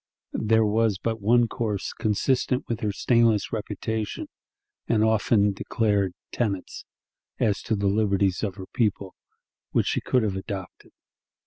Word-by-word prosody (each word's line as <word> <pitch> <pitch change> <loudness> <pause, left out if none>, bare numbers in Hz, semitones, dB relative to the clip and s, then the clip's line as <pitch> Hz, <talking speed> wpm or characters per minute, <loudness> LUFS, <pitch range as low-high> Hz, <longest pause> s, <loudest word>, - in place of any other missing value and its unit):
There 110 0 +3
was 110 -1 +2
but 115 +1 -3
one 120 +3 +4
course 110 -4 -3
consistent 125 +4 0
with 115 -1 -2
her 105 -4 -1
stainless 115 0 +2
reputation 110 0 -3 0.6
and 110 -2 +3
often 110 -2 +3
declared 100 -2 0 0.2
tenets, 100 -6 -3 0.5
as 105 -2 +1
to 110 - -1
the 100 0 -2
liberties 100 -2 +2
of 100 -4 -2
her 95 -2 -8
people, 100 -4 -1 0.6
which - - +3
she - - 0
could 125 -2 +1
have 100 -3 -1
adopted. 95 -1 -7
105 Hz, 135 wpm, -25 LUFS, 100-115 Hz, 0.6 s, one